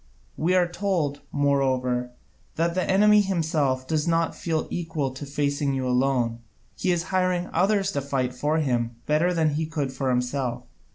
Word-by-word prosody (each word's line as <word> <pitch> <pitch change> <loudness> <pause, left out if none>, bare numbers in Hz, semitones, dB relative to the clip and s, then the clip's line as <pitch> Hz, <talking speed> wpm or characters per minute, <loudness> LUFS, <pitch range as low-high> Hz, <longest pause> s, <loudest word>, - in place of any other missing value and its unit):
We 175 +4 +1
are 180 -1 +4
told, 175 -6 -1
moreover, 130 -3 +1 0.5
that 170 +1 +1
the 185 +1 -1
enemy 210 +2 +6
himself 155 -9 0
does 155 0 0
not 165 0 +1
feel 160 -2 -1
equal 160 -6 -2
to 135 +2 -8
facing 140 0 0
you 130 -1 -1
alone, 125 -2 +1 0.4
he 185 - 0
is 175 -1 0
hiring 185 -1 +1
others 195 +2 +2
to 140 - -2
fight 130 -2 -1
for 150 +5 0
him 120 -6 0
better 155 +4 +2
than 160 -3 +2
he 155 +2 -1
could 145 -4 -3
for 130 0 -2
himself. 125 0 -1
150 Hz, 165 wpm, -25 LUFS, 130-175 Hz, 0.5 s, enemy